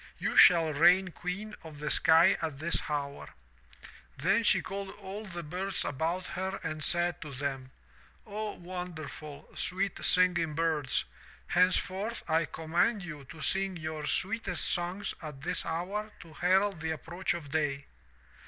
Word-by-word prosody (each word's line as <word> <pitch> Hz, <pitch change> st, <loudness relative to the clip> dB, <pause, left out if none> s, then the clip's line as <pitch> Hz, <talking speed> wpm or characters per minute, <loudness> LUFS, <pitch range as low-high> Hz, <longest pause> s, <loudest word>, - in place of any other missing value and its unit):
You -, -, -2 dB
shall 165 Hz, -3 st, +7 dB
reign 180 Hz, +5 st, +5 dB
queen 195 Hz, +5 st, -5 dB
of 160 Hz, -2 st, -10 dB
the 150 Hz, +1 st, -2 dB
sky 165 Hz, +3 st, +6 dB
at 155 Hz, -4 st, -3 dB
this 165 Hz, +4 st, -1 dB
hour.' 140 Hz, -1 st, -3 dB, 0.9 s
'Then 195 Hz, +10 st, +3 dB
she -, -, +4 dB
called 195 Hz, +1 st, -5 dB
all 200 Hz, +2 st, -7 dB
the 175 Hz, -2 st, -6 dB
birds 185 Hz, +5 st, -2 dB
about 165 Hz, +6 st, -1 dB
her 190 Hz, +1 st, -3 dB
and 155 Hz, 0 st, -2 dB
said 175 Hz, +1 st, +1 dB
to 150 Hz, -, -7 dB
them, 135 Hz, -1 st, -3 dB, 0.6 s
*0, 215 Hz, 0 st, -4 dB
wonderful, 170 Hz, -5 st, -7 dB
sweet 190 Hz, +1 st, -2 dB
singing 175 Hz, -4 st, +4 dB
birds, 155 Hz, -5 st, +1 dB, 0.4 s
henceforth 185 Hz, +4 st, +1 dB
I 160 Hz, 0 st, +3 dB
command 170 Hz, +8 st, 0 dB
you 150 Hz, -5 st, -8 dB
to 155 Hz, +4 st, -11 dB
sing 190 Hz, +4 st, 0 dB
your 155 Hz, -2 st, -4 dB
sweetest 210 Hz, -3 st, -1 dB
songs 180 Hz, +3 st, -1 dB
at 150 Hz, -4 st, -8 dB
this 180 Hz, +4 st, -3 dB
hour 195 Hz, +6 st, -2 dB
to 165 Hz, -1 st, -13 dB
herald 190 Hz, +2 st, +2 dB
the 160 Hz, 0 st, -3 dB
approach 170 Hz, +3 st, -2 dB
of 145 Hz, -5 st, -7 dB
day.' 140 Hz, -2 st, 0 dB
175 Hz, 145 wpm, -31 LUFS, 155-190 Hz, 0.9 s, shall